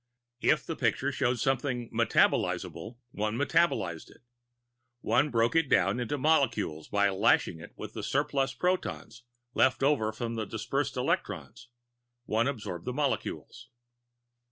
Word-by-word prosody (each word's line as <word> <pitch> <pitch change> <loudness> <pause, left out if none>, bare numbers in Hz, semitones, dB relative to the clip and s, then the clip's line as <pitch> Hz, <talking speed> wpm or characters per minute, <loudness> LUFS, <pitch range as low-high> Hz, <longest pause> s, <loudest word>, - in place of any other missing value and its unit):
If - - +2
the - - -4
picture - - 0
showed 120 +1 0
something 125 -1 0
metabolizable, 120 - +1
one 110 +1 -2
metabolized 140 - +1
it. - - -20 0.8
One 145 +1 +2
broke 115 +2 +1
it 165 -4 +3
down 100 +5 +3
into 125 +4 -2
molecules 115 - +1
by 100 0 +2
lashing 95 -4 +2
it 85 - -11
with - - -7
the - - -5
surplus 135 -1 0
protons 180 -9 -2 0.3
left 130 0 +2
over 135 -7 +2
from 115 +1 -4
the 110 -2 -3
dispersed 125 +6 -2
electrons; 120 - -2 0.6
one 115 +2 +1
adsorbed 105 -10 -4
the 125 - -3
molecules. 140 0 -3
120 Hz, 130 wpm, -29 LUFS, 105-140 Hz, 0.8 s, it